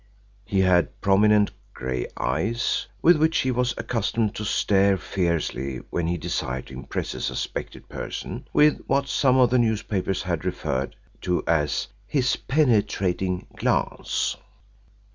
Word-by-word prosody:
He 100 Hz, -1 st, +1 dB
had 90 Hz, -2 st, +2 dB
prominent 105 Hz, +1 st, +4 dB, 0.2 s
grey 65 Hz, -1 st, -3 dB
eyes 100 Hz, -, 0 dB, 0.2 s
with 175 Hz, 0 st, +7 dB
which 160 Hz, +1 st, +2 dB
he 130 Hz, -, 0 dB
was 125 Hz, 0 st, 0 dB
accustomed 115 Hz, -2 st, -1 dB
to 105 Hz, -, -5 dB
stare 100 Hz, -1 st, +3 dB
fiercely 85 Hz, -9 st, -1 dB
when 85 Hz, -2 st, -1 dB
he 85 Hz, +1 st, 0 dB
desired 65 Hz, -4 st, -3 dB
to -, -, -12 dB
impress 65 Hz, 0 st, -4 dB
a -, -, -6 dB
suspected -, -, -4 dB
person -, -, -6 dB
with 150 Hz, 0 st, +4 dB
what 140 Hz, 0 st, +1 dB
some 130 Hz, -2 st, +3 dB
of 125 Hz, -2 st, +5 dB
the 125 Hz, -, +4 dB
newspapers 105 Hz, -4 st, 0 dB
had 85 Hz, -4 st, -2 dB
referred 65 Hz, +1 st, -2 dB, 0.3 s
to 90 Hz, -1 st, 0 dB
as 75 Hz, -3 st, +1 dB, 0.2 s
"his 130 Hz, -2 st, +1 dB
penetrating 100 Hz, -, +1 dB
glance." -, -, 0 dB
100 Hz, 135 wpm, -25 LUFS, 85-120 Hz, 0.3 s, with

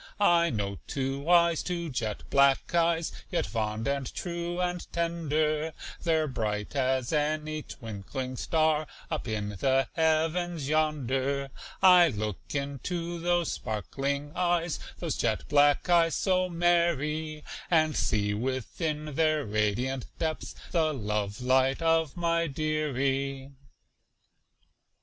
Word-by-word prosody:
I 170 Hz, -4 st, +4 dB
know 100 Hz, -3 st, -3 dB
two 135 Hz, +2 st, -3 dB
eyes 170 Hz, -2 st, +5 dB
two 170 Hz, -3 st, -3 dB
jet 110 Hz, -5 st, -3 dB
black 140 Hz, +2 st, +4 dB
eyes, 170 Hz, -1 st, +2 dB, 0.2 s
Yet 175 Hz, -, 0 dB
fond 110 Hz, 0 st, -2 dB
and 140 Hz, -2 st, -1 dB
true 175 Hz, 0 st, -4 dB
and 180 Hz, -1 st, -2 dB
tender; 155 Hz, -2 st, 0 dB, 0.3 s
They're 160 Hz, -2 st, +2 dB
bright 105 Hz, -3 st, -3 dB
as 130 Hz, 0 st, 0 dB
any 155 Hz, +1 st, 0 dB
twinkling 125 Hz, +2 st, -6 dB
star 155 Hz, +2 st, +1 dB, 0.2 s
Up 155 Hz, -5 st, -3 dB
in 105 Hz, -2 st, -2 dB
the 130 Hz, +6 st, +1 dB
heavens 160 Hz, -1 st, +1 dB
yonder. 140 Hz, -3 st, 0 dB, 0.3 s
I 180 Hz, -2 st, +8 dB
look 105 Hz, -, -3 dB, 0.2 s
into 165 Hz, +5 st, -3 dB
those 175 Hz, -1 st, +1 dB
sparkling 140 Hz, +7 st, -3 dB
eyes, 175 Hz, -2 st, +1 dB, 0.2 s
Those -, -, -3 dB
jet -, -, -1 dB
black 145 Hz, +2 st, +4 dB
eyes 170 Hz, -2 st, +4 dB
so 185 Hz, -1 st, +1 dB
merry, 160 Hz, -3 st, +1 dB, 0.3 s
And 155 Hz, -3 st, +3 dB
see 105 Hz, -1 st, +1 dB
within 145 Hz, -, -3 dB
their 155 Hz, 0 st, +2 dB
radiant 110 Hz, +5 st, -1 dB
depths 160 Hz, -1 st, -3 dB, 0.2 s
The 160 Hz, -3 st, +1 dB
love 105 Hz, -2 st, -2 dB
light 130 Hz, +4 st, +2 dB
of 165 Hz, -1 st, +2 dB
my 170 Hz, -1 st, +1 dB
"dearie." 140 Hz, -2 st, -1 dB
150 Hz, 115 wpm, -28 LUFS, 130-165 Hz, 0.3 s, I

